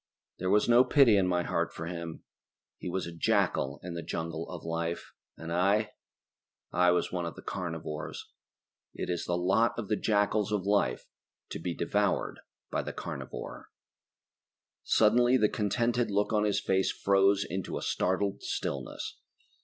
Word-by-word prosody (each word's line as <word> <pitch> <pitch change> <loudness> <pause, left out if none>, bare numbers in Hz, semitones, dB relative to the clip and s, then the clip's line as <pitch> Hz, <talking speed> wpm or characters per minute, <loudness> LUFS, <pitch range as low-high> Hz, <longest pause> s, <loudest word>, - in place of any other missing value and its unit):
There 90 - -1
was 105 +2 +4
no 120 +1 +7
pity 130 -6 +5
in 95 -2 +3
my 90 -1 +1
heart - - -1
for 80 - -6
him. 85 -1 -6 0.6
He - - -5
was 95 +1 -2
a 85 - -7
jackal 70 -3 +1
in 90 -1 -5
the 85 - -4
jungle 80 0 -4
of 90 -3 -7
life, 85 +1 -3 0.2
and 80 +1 -5
I... 100 +4 +2 0.8
I 90 0 +4
was 90 - +1
one 90 -2 -2
of 85 - -6
the - - -11
carnivores. 80 -5 -5 0.7
It - - -3
is 85 - -2
the 85 - 0
lot 100 +6 +2
of 115 -4 -4
the 105 - +3
jackals 105 0 +1
of 100 -3 0
life 100 -12 +1 0.4
to - - -5
be 85 0 -3
devoured - - 0 0.3
by - - 0
the - - -6
carnivore. - - -7 1.1
Suddenly 120 +4 +4
the 105 -3 +3
contented 115 +3 0
look 105 +2 +1
on 105 -1 +3
his 105 -1 +2
face 95 -1 +1
froze 100 0 +3
into 95 +4 -3
a - - -5
startled 100 +2 0
stillness. - - -4
95 Hz, 160 wpm, -30 LUFS, 85-105 Hz, 1.1 s, no